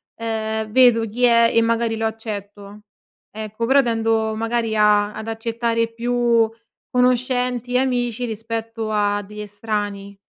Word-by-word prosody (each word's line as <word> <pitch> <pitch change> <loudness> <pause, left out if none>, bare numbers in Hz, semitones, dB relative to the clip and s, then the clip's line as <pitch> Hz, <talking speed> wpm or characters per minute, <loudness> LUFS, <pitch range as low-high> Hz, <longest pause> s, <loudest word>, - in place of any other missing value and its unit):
ehm, 220 -1 -3
vedo 235 -2 +5
chi 240 +4 -4
è 235 -1 +5
e 230 - +4
magari 230 0 +1
lo 225 0 -2
accetto. 205 -2 -6 0.5
Ecco, 215 +1 -4
però 275 +3 +5
tendo 225 -2 0
magari 225 0 -1
a 210 -1 +3
ad 220 - -7
accettare 230 0 -1
più 235 -1 +1 0.4
conoscenti, 250 0 +1
amici, 245 -2 0
rispetto 225 0 -4
a 205 -1 +1
degli 210 +2 -11
estranei. 205 -1 -4
225 Hz, 130 wpm, -21 LUFS, 215-235 Hz, 0.5 s, vedo